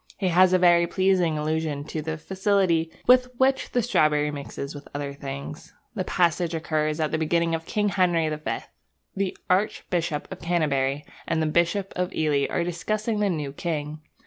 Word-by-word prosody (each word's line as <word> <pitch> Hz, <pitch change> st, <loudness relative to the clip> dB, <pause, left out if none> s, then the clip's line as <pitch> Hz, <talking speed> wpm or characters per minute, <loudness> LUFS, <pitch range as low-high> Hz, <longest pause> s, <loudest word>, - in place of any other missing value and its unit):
He 190 Hz, -3 st, 0 dB
has 180 Hz, +1 st, +5 dB
a 185 Hz, -, +5 dB
very 175 Hz, -1 st, +5 dB
pleasing 185 Hz, -3 st, +2 dB
allusion 155 Hz, -1 st, -1 dB
to 155 Hz, +1 st, -5 dB
the 160 Hz, +1 st, -4 dB
facility 185 Hz, -2 st, +1 dB, 0.2 s
with 250 Hz, 0 st, +6 dB
which 265 Hz, +1 st, +2 dB
the 245 Hz, -, 0 dB
strawberry 150 Hz, -9 st, +2 dB
mixes 140 Hz, 0 st, -6 dB
with 145 Hz, -1 st, -10 dB
other 140 Hz, -1 st, -3 dB
things. 140 Hz, +1 st, -8 dB, 0.2 s
The 195 Hz, -5 st, -2 dB
passage 175 Hz, -2 st, +1 dB
occurs 155 Hz, -1 st, -1 dB
at 155 Hz, -1 st, 0 dB
the 155 Hz, -, 0 dB
beginning 165 Hz, +1 st, +1 dB
of 165 Hz, 0 st, -3 dB
King 210 Hz, -1 st, +1 dB
Henry 175 Hz, -4 st, +2 dB
the 155 Hz, 0 st, -3 dB
Fifth. 155 Hz, -, -4 dB, 0.5 s
The 195 Hz, -1 st, -2 dB
Archbishop 175 Hz, -4 st, 0 dB
of 190 Hz, -, -8 dB
Canterbury 150 Hz, -5 st, 0 dB, 0.2 s
and 165 Hz, -, 0 dB
the 160 Hz, -, +1 dB
Bishop 170 Hz, +5 st, +1 dB
of 180 Hz, +1 st, -1 dB
Ely 150 Hz, -3 st, +1 dB
are 175 Hz, -, 0 dB
discussing 210 Hz, +6 st, -2 dB
the 205 Hz, -1 st, +2 dB
new 150 Hz, -6 st, -3 dB
king. 155 Hz, -1 st, -4 dB
165 Hz, 175 wpm, -25 LUFS, 150-185 Hz, 0.5 s, with